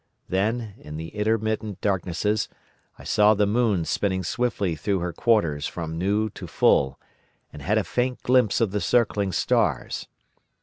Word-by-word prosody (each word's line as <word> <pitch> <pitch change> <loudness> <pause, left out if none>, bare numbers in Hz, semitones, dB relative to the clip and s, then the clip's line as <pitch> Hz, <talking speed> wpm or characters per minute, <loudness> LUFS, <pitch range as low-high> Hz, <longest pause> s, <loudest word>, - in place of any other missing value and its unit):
Then, 110 +3 -1
in 75 0 -8
the 80 +1 -6
intermittent 110 0 -1
darknesses, 100 +2 0 0.5
I - - -13
saw 105 +1 +4
the 105 0 +3
moon 105 -5 +1
spinning 95 0 -1
swiftly 100 -3 -1
through 100 +6 -1
her 90 -1 -3
quarters 85 -11 +1
from 80 -1 -5
new 105 +3 0
to - - -9
full, 65 -1 +2 0.5
and 75 - -9
had 100 +9 +1
a 110 - +2
faint 125 +3 -2
glimpse 125 -4 +3
of 110 -4 +2
the 105 0 -1
circling 105 -5 +1
stars. - - 0
105 Hz, 150 wpm, -25 LUFS, 90-110 Hz, 0.5 s, saw